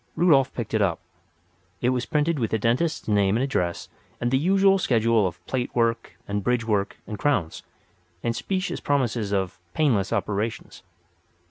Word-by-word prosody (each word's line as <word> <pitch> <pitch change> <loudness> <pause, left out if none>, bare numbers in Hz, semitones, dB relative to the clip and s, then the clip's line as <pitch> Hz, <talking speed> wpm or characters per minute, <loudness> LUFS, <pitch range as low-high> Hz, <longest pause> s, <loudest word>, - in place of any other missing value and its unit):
Rudolf 145 -7 +4
picked 115 -3 -5
it 110 - +2
up. 90 -5 +1 0.8
It 125 - +1
was 125 -1 -1
printed 150 0 +1
with 115 -3 0
the 110 - +1
dentist's 120 +10 0
name 100 -1 +2
and 125 - 0
address 90 -11 -1 0.3
and 120 - -1
the 130 - +4
usual 195 +4 +4
schedule 115 - +2
of 90 - -9
"plate 125 -2 -3
work" 115 -1 0
and 100 0 -2
"bridge 125 0 +1
work" 105 -3 0
and 105 - -6
"crowns," 95 - 0 0.6
and 115 -1 0
specious 190 +6 -2
promises 120 -7 0
of 95 -3 -1 0.2
"painless" 115 -11 +2
operations. 105 +2 -3
115 Hz, 160 wpm, -25 LUFS, 105-140 Hz, 0.8 s, Rudolf